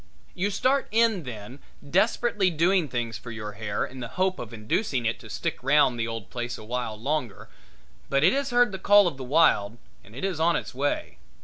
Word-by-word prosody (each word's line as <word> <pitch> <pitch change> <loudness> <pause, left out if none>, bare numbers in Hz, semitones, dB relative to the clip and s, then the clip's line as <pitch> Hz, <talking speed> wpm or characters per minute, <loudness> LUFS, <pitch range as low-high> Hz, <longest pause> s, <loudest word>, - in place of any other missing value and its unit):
You 190 +3 -1
start 260 +7 +1
in 220 -6 +2
then 120 +2 -8 0.3
desperately 205 +3 +2
doing 175 +1 +2
things 120 -4 -3
for 120 - -10
your 110 -2 -6
hair 105 0 -3
in 130 - -10
the 120 - -5
hope 185 0 +1
of 115 - -7
inducing 120 - -1
it 115 +1 -1
to 110 -3 -12
stick - - -3
round 135 -2 +3
the 115 - -1
old 115 -3 -6
place 120 0 -4
a - - -11
while 115 -1 -4
longer, 135 -3 -3 0.6
but 140 +1 +2
it 180 - +5
has 275 0 -1
heard 245 -2 +3
the 190 - -6
call 205 0 +6
of 165 - -3
the 135 - -6
wild 125 -7 +3 0.3
and 105 +3 -16
it 135 - -3
is 185 -5 -2
on 170 +1 +3
its 120 - -4
way. 140 +3 -2
135 Hz, 210 wpm, -26 LUFS, 115-190 Hz, 0.6 s, call